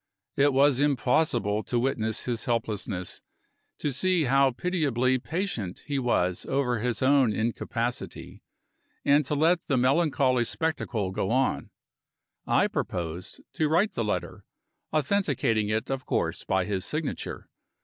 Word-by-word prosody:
It 145 Hz, +1 st, +4 dB
was 135 Hz, 0 st, +4 dB
impossible 125 Hz, -6 st, +1 dB
to 120 Hz, -, -2 dB
witness 115 Hz, -4 st, -1 dB
his 120 Hz, 0 st, -3 dB
helplessness, 105 Hz, -6 st, -3 dB, 0.6 s
to 145 Hz, -, -1 dB
see 175 Hz, +5 st, +1 dB
how 135 Hz, 0 st, +4 dB
pitiably 130 Hz, -4 st, 0 dB
patient 145 Hz, -, -3 dB
he 140 Hz, -2 st, -1 dB
was 90 Hz, -8 st, 0 dB
over 130 Hz, -4 st, 0 dB
his 120 Hz, +1 st, -1 dB
own 135 Hz, -3 st, +4 dB
incapacity, 115 Hz, +2 st, -3 dB, 0.6 s
and 145 Hz, +2 st, +5 dB
to 150 Hz, -, 0 dB
let 165 Hz, +4 st, +2 dB
the 135 Hz, -, +2 dB
melancholy 130 Hz, -2 st, +2 dB
spectacle 115 Hz, -11 st, -2 dB
go 95 Hz, 0 st, -2 dB
on. 130 Hz, +3 st, 0 dB, 0.8 s
I -, -, +3 dB
proposed 85 Hz, +1 st, -4 dB
to 155 Hz, -1 st, 0 dB
write 180 Hz, +7 st, +3 dB
the 115 Hz, -, -1 dB
letter; 90 Hz, -5 st, -3 dB, 0.5 s
authenticating 140 Hz, -, +1 dB
it, 110 Hz, +4 st, -1 dB
of 135 Hz, -1 st, -4 dB
course, -, -, -1 dB
by 95 Hz, -1 st, +1 dB
his 95 Hz, -2 st, -2 dB
signature. 150 Hz, +6 st, -4 dB
130 Hz, 130 wpm, -27 LUFS, 110-145 Hz, 0.8 s, and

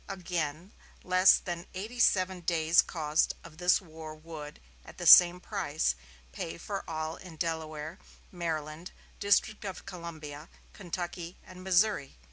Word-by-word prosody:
Again, 175 Hz, -2 st, -3 dB, 0.3 s
less 185 Hz, +1 st, +6 dB
than 175 Hz, -2 st, -6 dB
eighty 220 Hz, +6 st, -6 dB
seven 185 Hz, -4 st, +3 dB
days' 165 Hz, -1 st, +4 dB
cost 155 Hz, -2 st, 0 dB
of 165 Hz, -1 st, -13 dB
this 180 Hz, 0 st, +4 dB
war 160 Hz, -4 st, -10 dB
would, 155 Hz, -1 st, -9 dB, 0.2 s
at -, -, -14 dB
the 175 Hz, -, -5 dB
same 175 Hz, +1 st, +9 dB
price, 155 Hz, -, -1 dB, 0.4 s
pay 165 Hz, -, -5 dB
for 195 Hz, +3 st, -5 dB
all 155 Hz, 0 st, -3 dB
in 180 Hz, -3 st, -11 dB
Delaware, 160 Hz, 0 st, -4 dB, 0.3 s
Maryland, 160 Hz, -1 st, -4 dB, 0.3 s
District 205 Hz, +1 st, +2 dB
of 195 Hz, -3 st, -6 dB
Columbia, 160 Hz, -4 st, -8 dB, 0.2 s
Kentucky 175 Hz, -2 st, -6 dB
and 185 Hz, 0 st, -12 dB
Missouri.... 190 Hz, -5 st, +2 dB
170 Hz, 130 wpm, -30 LUFS, 155-185 Hz, 0.4 s, same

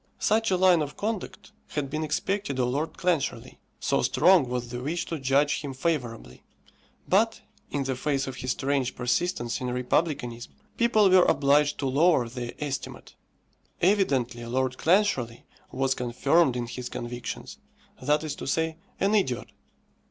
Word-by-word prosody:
Such 225 Hz, +1 st, +2 dB
a 185 Hz, -, +2 dB
line 180 Hz, -3 st, +5 dB
of 145 Hz, -1 st, -5 dB
conduct 210 Hz, -1 st, -4 dB, 0.2 s
had 140 Hz, -2 st, -4 dB
been 155 Hz, +1 st, -2 dB
expected 190 Hz, 0 st, -2 dB
of 125 Hz, -1 st, +1 dB
Lord 145 Hz, +5 st, -2 dB
Clancharlie, 175 Hz, -5 st, -1 dB, 0.2 s
so -, -, +1 dB
strong 170 Hz, -6 st, +4 dB
was 125 Hz, -1 st, -3 dB
the 120 Hz, 0 st, -5 dB
wish 170 Hz, +6 st, -2 dB
to 165 Hz, -, -4 dB
judge 140 Hz, +2 st, +2 dB
him 140 Hz, -3 st, -6 dB
favourably; 125 Hz, -, -3 dB, 0.7 s
but, -, -, +2 dB, 0.3 s
in 145 Hz, -1 st, -1 dB
the 135 Hz, -1 st, -2 dB
face 135 Hz, +1 st, -1 dB
of 130 Hz, -1 st, -6 dB
his 130 Hz, -, -5 dB
strange 135 Hz, 0 st, 0 dB
persistence 125 Hz, 0 st, -1 dB
in 125 Hz, -, -2 dB
republicanism, 125 Hz, -2 st, -1 dB, 0.2 s
people 225 Hz, -3 st, +4 dB
were 185 Hz, -1 st, +6 dB
obliged 145 Hz, +1 st, +3 dB
to 140 Hz, -, -3 dB
lower 140 Hz, -1 st, +3 dB
their 120 Hz, 0 st, -6 dB
estimate. 145 Hz, -2 st, -5 dB, 0.7 s
Evidently 135 Hz, -, +1 dB
Lord 130 Hz, +2 st, -1 dB
Clancharlie 160 Hz, -, +1 dB, 0.3 s
was 135 Hz, 0 st, +1 dB
confirmed 130 Hz, +4 st, +2 dB
in 120 Hz, -1 st, -2 dB
his 120 Hz, +1 st, -6 dB
convictions 120 Hz, -1 st, -6 dB, 0.4 s
that 150 Hz, +1 st, +1 dB
is 155 Hz, -2 st, -3 dB
to -, -, -6 dB
say, 160 Hz, +2 st, 0 dB, 0.2 s
an 200 Hz, +2 st, +2 dB
idiot! 160 Hz, -, 0 dB
140 Hz, 150 wpm, -27 LUFS, 125-170 Hz, 0.7 s, were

